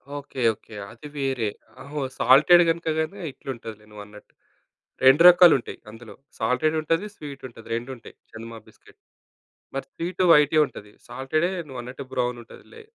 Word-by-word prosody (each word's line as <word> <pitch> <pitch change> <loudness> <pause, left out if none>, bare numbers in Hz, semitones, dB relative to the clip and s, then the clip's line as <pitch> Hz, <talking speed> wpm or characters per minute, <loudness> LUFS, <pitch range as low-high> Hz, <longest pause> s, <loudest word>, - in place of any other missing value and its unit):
Okay. 140 -2 -7
Okay. 105 +1 -16 0.2
అది 115 +6 -12
వేరే. 135 -5 -1 0.3
ఆహో! 145 +1 -6 0.2
సాల్టెడ్ 155 +7 +6
గనుకగనే 165 +3 -2
ఇట్లుంటది 115 -5 -9
నువ్వు 105 -1 -10
అన్నట్టు. 105 0 -17 0.7
2 135 +5 +7
రకాలు 175 -1 +7
ఉంటాయి 120 - -9
అందులో. 115 0 -13 0.2
సాల్టెడ్ 125 +7 0
ఉంటది, 165 +6 -1
స్వీట్ 140 -6 -10
ఉంటది. 115 -2 -16
2 120 +3 -5
ఉంటాయి. 115 - -15 0.2
చందమా 115 0 -9
బిస్కిట్. - - -22 0.8
మరి 135 - -3
స్వీటు 180 +2 -3
వైటే 150 0 +4
ఉంటది. 105 0 -13 0.2
సాల్టెడే 155 +8 -1 0.2
నువ్వు 130 -2 -8
అన్నట్టు 130 +3 -9
బ్రౌన్ 125 -1 -2
ఉంటదిలే. 445 - -15
135 Hz, 145 wpm, -24 LUFS, 115-155 Hz, 0.8 s, 2